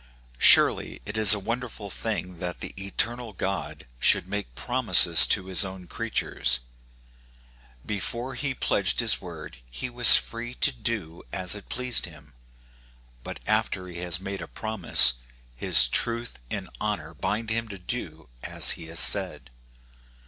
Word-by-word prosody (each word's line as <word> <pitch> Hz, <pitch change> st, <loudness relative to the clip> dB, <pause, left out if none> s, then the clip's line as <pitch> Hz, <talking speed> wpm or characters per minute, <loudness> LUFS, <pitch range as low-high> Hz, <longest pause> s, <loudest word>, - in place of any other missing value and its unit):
URELY -, -, +4 dB
it -, -, -8 dB
is 110 Hz, -3 st, +5 dB
a 105 Hz, -, +4 dB
wonderful 115 Hz, -2 st, -7 dB
thing 90 Hz, -5 st, -6 dB
that 90 Hz, -1 st, -7 dB
the -, -, -8 dB
eternal 110 Hz, +4 st, -4 dB
God 80 Hz, -8 st, -6 dB
should 85 Hz, -, +2 dB
make 100 Hz, -11 st, -7 dB
promises 115 Hz, -9 st, +6 dB
to 95 Hz, -, -1 dB
his 95 Hz, 0 st, +6 dB
own 95 Hz, -1 st, -9 dB
creatures. 65 Hz, -5 st, -2 dB, 1.2 s
Before 115 Hz, +6 st, -6 dB
he 140 Hz, -3 st, -5 dB
pledged 95 Hz, -5 st, -1 dB
his 115 Hz, -2 st, 0 dB
word 85 Hz, -8 st, -11 dB
he 125 Hz, -, -8 dB
was 120 Hz, 0 st, +9 dB
free 120 Hz, +1 st, -8 dB
to -, -, +1 dB
do 110 Hz, -9 st, -5 dB
as 95 Hz, -2 st, +2 dB
it 105 Hz, -1 st, -11 dB
pleased 125 Hz, -5 st, -2 dB
him; 75 Hz, -4 st, -18 dB, 0.9 s
but -, -, -10 dB
after 95 Hz, -1 st, -2 dB
he 85 Hz, -1 st, -10 dB
has 90 Hz, -1 st, -2 dB
made 95 Hz, 0 st, -8 dB
a -, -, -9 dB
promise, 110 Hz, -, +3 dB, 0.4 s
his 60 Hz, 0 st, +3 dB
truth 115 Hz, -, -4 dB
and -, -, -6 dB
honor -, -, -5 dB
bind 110 Hz, +1 st, -5 dB
him 115 Hz, +1 st, -4 dB
to 100 Hz, -2 st, -10 dB
do 90 Hz, -, -8 dB
as -, -, 0 dB
he 80 Hz, -, -9 dB
has 80 Hz, 0 st, -2 dB
said. 65 Hz, -2 st, +3 dB
100 Hz, 150 wpm, -24 LUFS, 85-115 Hz, 1.2 s, was